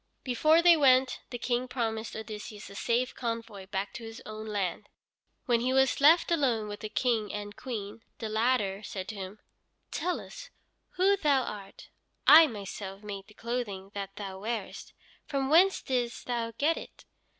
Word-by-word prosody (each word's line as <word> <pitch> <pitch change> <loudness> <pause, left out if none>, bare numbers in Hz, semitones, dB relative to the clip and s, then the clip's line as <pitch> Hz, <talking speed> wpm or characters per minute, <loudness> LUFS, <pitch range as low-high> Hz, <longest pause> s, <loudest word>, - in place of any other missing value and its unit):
Before 310 +6 +4
they 345 -1 +8
went 260 -3 +4
the 245 - -5
King 245 +2 -1
promised 225 -3 -3
Odysseus 210 -1 -7
a - - -11
safe 240 +4 0
convoy 230 -5 -5
back 195 0 -3
to 235 - -8
his 225 0 -8
own 215 0 -7
land. 205 -1 -2 0.6
When 240 -2 +3
he 255 +2 0
was 265 +1 +3
left 325 +4 +6
alone 250 -10 +1
with 205 0 -6
the 215 - -5
King 225 -4 0
and 205 0 -6
Queen, 220 -3 -6 0.2
the 225 - -4
latter 215 -3 +1
said 190 -2 -6
to 220 - -5
him: 195 +1 -7 0.5
"Tell 360 0 -1
us - - -10 0.4
who 390 +2 +3
thou 285 -7 +3
art. 200 -4 -8 0.4
I 320 +1 +10
myself 200 -3 -7
made 200 -2 -7
the 210 - -18
clothing 215 -5 -4
that 195 -1 -6
thou 195 -2 -6
wearest. 220 -1 -5 0.3
From 275 -1 -1
whence 370 +4 +5
didst 245 -2 -2
thou 235 -2 -1
get 315 +3 +2
it?" - - -10
230 Hz, 170 wpm, -29 LUFS, 205-260 Hz, 0.6 s, I